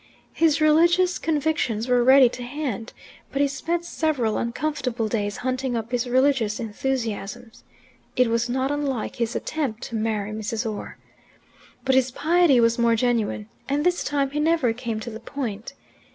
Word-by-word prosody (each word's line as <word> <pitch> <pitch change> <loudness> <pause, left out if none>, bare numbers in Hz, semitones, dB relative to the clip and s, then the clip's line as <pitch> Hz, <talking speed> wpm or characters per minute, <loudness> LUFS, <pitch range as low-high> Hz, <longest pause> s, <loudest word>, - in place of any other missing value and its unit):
His 320 -2 +3
religious 340 +4 +4
convictions 295 -8 0
were 245 -1 +3
ready 260 +1 +7
to 245 - -6
hand, 245 -3 -4 0.4
but 275 - -2
he 285 - +4
spent 335 +5 -2
several 285 -11 0
uncomfortable 250 -2 -2
days 205 -2 -2
hunting 255 -1 -1
up 225 +1 -5
his 245 0 -1
religious 255 -4 +2
enthusiasms. 225 -1 -4 0.5
It 250 - +4
was 230 +1 0
not 260 +2 0
unlike 280 -5 -2
his 235 0 -1
attempt 260 -7 -3
to 230 - -6
marry 215 -2 -1
Mrs. 220 +2 -3
Orr. 215 -2 -6 0.9
But 265 - +3
his 260 -1 +3
piety 310 0 +3
was 230 0 +3
more 235 -1 +4
genuine, 225 -3 0 0.2
and 290 +3 0
this 355 0 +2
time 280 -2 0
he 295 - -2
never 300 -6 +2
came 230 -2 -4
to 235 - -6
the 220 - -7
point. 235 -3 -5
250 Hz, 160 wpm, -24 LUFS, 225-285 Hz, 0.9 s, ready